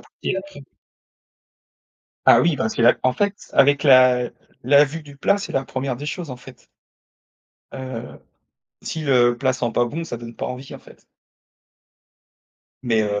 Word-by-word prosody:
partie - - -6
la 190 - -2
pri 195 -8 -14 1.6
Ah - - +7
oui, 165 -2 +2
parce 110 - -2
que 115 - 0
là, 120 - +5
en 130 0 +2
fait, 200 +5 -3
avec 140 +1 +4
la 130 -3 +5 0.3
la 140 +2 +6
vue 155 +3 -7
du 145 -1 -14
plat, 200 +8 +1
c'est 200 - -7
la 135 0 -1
1re 130 -1 -4
des 145 - -7
choses, 165 -1 -5
en 125 - -6
fait. 125 0 -16 1.1
Heu, 130 -3 -8 0.6
si 160 - -5
le 120 -4 +3
plat 130 +1 +1
sent 125 -2 -2
pas 120 - +1
bon, 155 +8 -5
ça 140 - -5
donne 115 0 -10
pas - - -4
envie, 130 +1 -7
en - - -12
fait. - - -19 1.8
Mais, 115 -3 +1
heu, 105 -1 -2
130 Hz, 175 wpm, -21 LUFS, 120-145 Hz, 1.8 s, Ah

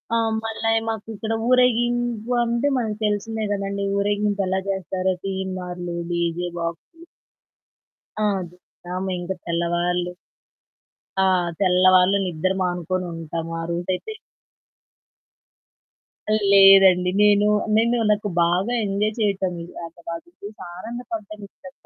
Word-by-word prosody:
ఆ - - +3 0.3
మళ్ళా 225 0 -1 0.2
మాకు 220 -1 -4
ఇక్కడ 220 +2 -3 0.2
ఊరేగింపు 240 -1 +2
అంటే 235 +4 0
మనకు 215 -3 -2
తెలిసిందే 215 +1 -1
కదండీ 200 0 -3
ఊరేగింపు 205 0 0
ఎలా 190 +1 0
జేస్తారో 190 0 -1
తీన్‌మార్లు 180 -2 -4 0.2
డీజే 170 +1 -1
బాక్సులు. 170 - -6 1.2
ఆ! - - +2 0.3
జాగరమే 180 +1 -6
ఇంకా 190 +2 -4
తెల్లవార్లు. 175 +1 -1 1.1
ఆ - - +4 0.3
తెల్లవాళ్ళు 185 +1 +5
నిద్ర 180 +1 -1
మానుకొని 180 0 -1
ఉంటాము. 165 0 -5
ఆ - - -4
రోజయితే 180 - -3 2.4
లేదండి 195 -2 +7
నేను, 205 0 +5 0.3
నేను 235 +2 +3
నాకు 210 0 0
బాగా 185 +8 +1
ఎంజాయ్ 205 +2 -1
చేయటమే 190 -5 -1 0.2
ఇంకా 170 +1 -18
వాళ్ళని 165 +1 -7
చూసి 210 +1 -9 0.2
ఆనందపడటం 225 0 -7
ఇష్టం 275 +6 -14
195 Hz, 105 wpm, -23 LUFS, 180-215 Hz, 2.4 s, లేదండి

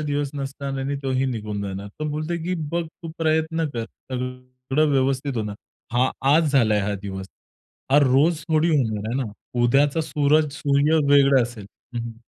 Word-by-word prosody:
दिवस 145 -2 -1
नसणार 135 0 -4
आणि 140 +1 -2
तोही 135 0 0
निघून 105 -5 -3
जाणार. 100 0 -5
तो 155 - -1
बोलतोय 155 +3 -2
की 180 +1 -1 0.2
"बघ 170 0 -1
तू 165 +1 -10
प्रयत्न 160 0 +1
कर, 115 -4 -3 0.3
सगळं 125 +3 -2
व्यवस्थित 135 -1 +1
होणार. 105 -2 -3 0.4
हा 125 +2 +3 0.2
आज 160 -1 +3
झालाय 110 -6 +4
हा 105 +1 -1
दिवस. 95 -1 -5 0.7
हा 145 - +7
रोज 145 +5 +4
थोडी 160 +1 +3
होणार 110 -8 0
आहे 120 - -1
ना? 110 -5 -6 0.3
उद्याचा 140 +5 +3
सूरज 150 0 +2
-सूर्य 145 +3 +2 0.2
वेगळा 140 -2 +6
असेल." 115 -4 -6 0.3
हं, 120 - -1
हं. 115 -1 -7
135 Hz, 165 wpm, -23 LUFS, 120-150 Hz, 0.7 s, हा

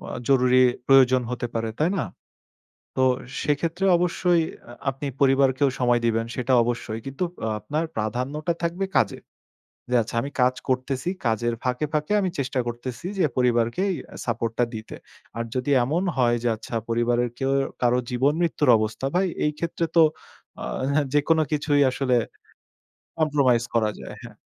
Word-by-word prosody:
আ - - -4
জরুরি 130 -1 +4 0.3
প্রয়োজন 130 -2 +6
হতে 120 0 -3
পারে, 115 0 -1
তাই 155 +4 +3
না? - - 0 0.9
তো 130 - +2 0.4
সেক্ষেত্রে 165 +6 -1
অবশ্যই 175 -1 +2
অ্যা 120 - -14 0.2
আপনি 135 +2 -6
পরিবারকেও 135 0 +4
সময় 120 -1 +3
দিবেন 115 0 +1
সেটা 125 0 0
অবশ্যই। 115 -2 -3
কিন্তু 135 +7 -3 0.2
আ - - 0
আপনার 150 +10 -2
প্রাধান্যটা 130 +10 -2
থাকবে 175 +3 -1
কাজে। - - +2 0.7
যে 125 - +1
আচ্ছা 115 +1 -6
আমি 140 +3 -5
কাজ 130 +1 +3
করতেছি, 130 +5 -1 0.2
কাজের 115 +1 +1
ফাঁকে, 125 +4 0
ফাঁকে 150 +6 0
আমি 190 - 0
চেষ্টা 135 -1 -1
করতেছি 120 +6 -6
যে, 185 - +2
পরিবারকে 120 +5 +2
এই - - -1 0.3
সাপোর্ট 115 -1 -1
টা - - +5
দিতে। 110 0 -7 0.4
আর 115 - -1
যদি 130 +3 -1
এমন 155 +9 0
হয় 120 -2 +3
যে 120 - +2
আচ্ছা 115 +2 -8
পরিবারের 120 +1 +1
কেউ 135 0 0 0.3
কারো 125 0 +3
জীবন 130 +4 +2
মৃত্যুর 155 -5 +1
অবস্থা, 110 +4 -3
ভাই 185 +1 +3 0.2
এই 150 - +2
ক্ষেত্রে 170 0 -1
তো 165 - +7 0.6
আ - - -4 0.3
হ্যাঁ, 145 0 +2
যেকোনো 155 +2 +3
কিছুই 145 -1 +2
আসলে 130 -1 +1 1.0
কম্প্রোমাইজ 140 -7 +3
করা 110 -2 +3
যায়, - - -8
হ্যাঁ। - - -11
130 Hz, 160 wpm, -24 LUFS, 120-150 Hz, 1.0 s, তো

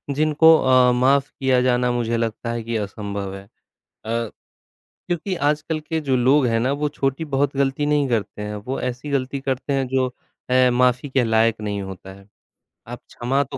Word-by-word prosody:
जिनको 155 +2 +5
अ, 130 -1 +4
माफ़ 135 +3 +2
किया 130 -2 +2
जाना 125 -1 +2
मुझे 120 -1 -1
लगता 115 0 -3
है 115 -1 -4
कि 115 +1 -4
असंभव 100 -1 -5
है। 95 - -9
अ, - - -28 1.6
क्योंकि 180 +2 -2
आजकल 150 +1 -1
के 160 +1 -3
जो 135 -3 0
लोग 130 +3 +4
हैं 115 -1 +1
ना 125 +4 0
वो 150 - +1
छोटी 140 +1 -2
बहुत 140 0 +1
गलती 140 +1 0
नहीं 145 -1 +2
करते 110 -3 -2
हैं, 105 0 -4
वो 125 +6 -5
ऐसी 125 +3 -4
गलती 140 0 -1
करते 135 +1 -2
हैं 135 -2 0
जो 130 0 +1 0.4
अ, 130 0 +4
माफ़ी 125 +2 +2
के 130 -1 +2
लायक 115 0 +2
नहीं 105 -1 -3
होता 95 0 -9
है, 100 0 -16 0.6
आप - - -7
क्षमा 135 +4 0
तो 135 0 -8
130 Hz, 185 wpm, -22 LUFS, 115-140 Hz, 1.6 s, जिनको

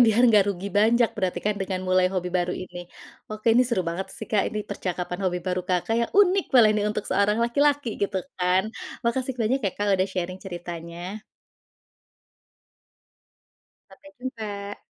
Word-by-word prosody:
Biar 225 +2 +4
nggak 210 -3 +6
rugi 195 +1 -5
banyak 230 +2 +4
berarti 180 -2 -1
kan, 210 0 +1
dengan 190 -1 -2
mulai 185 0 +4
hobi 180 -1 -1
baru 180 -1 +1
ini. 175 -1 -8 0.4
Oke, 215 +1 +1
ini 250 - +6
seru 230 -7 +1
banget 170 +3 -3
sih - - -7
Kak, 210 -3 +3
ini 215 - -3
percakapan 180 -2 -3
hobi 180 -1 0
baru 180 0 0
Kakak, 180 +4 +1
yang 235 - -1
unik 390 -1 +5
kalau 240 -4 +7
ini 210 -1 0
untuk 210 0 -3
seorang 210 +2 +2
laki-laki, 285 +2 +2
gitu 200 -1 0 0.2
kan. 180 +1 +3 0.4
Makasih 255 +2 0
banyak 235 +5 +2
ya 190 - +1
Kak, 205 0 +1
udah 185 +1 +1
sharing 185 0 -4
ceritanya. 175 +2 -7 2.7
Sampai 290 0 -16
jumpa. 205 -5 -5
200 Hz, 160 wpm, -25 LUFS, 180-230 Hz, 2.7 s, kalau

